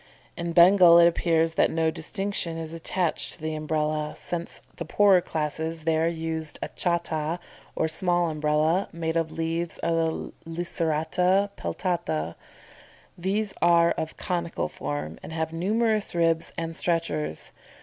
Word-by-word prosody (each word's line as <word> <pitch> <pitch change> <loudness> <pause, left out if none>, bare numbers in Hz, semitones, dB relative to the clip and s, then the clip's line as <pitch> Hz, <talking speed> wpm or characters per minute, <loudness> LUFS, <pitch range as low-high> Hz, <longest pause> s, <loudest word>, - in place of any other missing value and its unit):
In 170 -1 -3
Bengal 175 0 +8
it 170 - +8
appears 165 -1 +2
that - - +3
no 160 0 +1
distinction 170 0 -3
is 165 0 -6
attached 165 0 -1
to - - -10
the 155 0 -3
Umbrella, 155 0 -1
since 170 -1 -2 0.2
the - - -4
poorer 190 +2 +4
classes 160 0 -3
there 160 0 +2
use 160 -2 -3
a - - -4
cháta 170 -2 -1 0.4
or 160 - +1
small 175 +1 +1
Umbrella, 155 +4 +1
made 165 -1 -3
of 165 -1 0
leaves 165 +1 -2
of 170 0 +1
the 165 -1 -1 0.2
Licerata 175 +3 +1
peltata. 85 - -2 0.8
These 195 +3 -1
are 170 -1 +5
of 160 - -4
conical 170 - -2
form 75 +1 -5
and 160 - -8
have 160 0 -2
numerous 215 +4 +1
ribs 165 -1 +1
and 165 0 -4
stretchers. 160 - -2
165 Hz, 140 wpm, -26 LUFS, 160-175 Hz, 0.8 s, Bengal